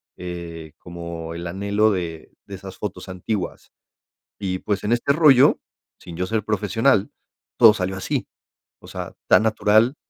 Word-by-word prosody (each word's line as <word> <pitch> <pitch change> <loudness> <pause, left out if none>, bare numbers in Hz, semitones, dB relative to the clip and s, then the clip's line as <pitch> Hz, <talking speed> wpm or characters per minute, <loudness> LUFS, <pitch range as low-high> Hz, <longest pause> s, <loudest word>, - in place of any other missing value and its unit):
eh, 85 -3 -7
como 85 -1 -7
el 85 +1 -6
anhelo 100 +4 +1
de 85 -4 -4
de 100 - -8
esas 95 0 -10
fotos 100 -1 -6
antiguas 95 +2 -4 0.7
y, 95 -2 -3
pues, 100 0 -2
en 105 - -1
este 120 +4 +2
rollo, 145 -3 +6 0.4
sin 85 -1 -10
yo 90 - -1
ser 110 +2 -1
profesional, 110 +2 +1 0.5
todo 115 -3 +8
salió 95 -2 -3
así, 95 - -3 0.5
o - - -15
sea, - - -7
tan - - +5
natural 110 +3 +3
95 Hz, 150 wpm, -22 LUFS, 90-110 Hz, 0.7 s, todo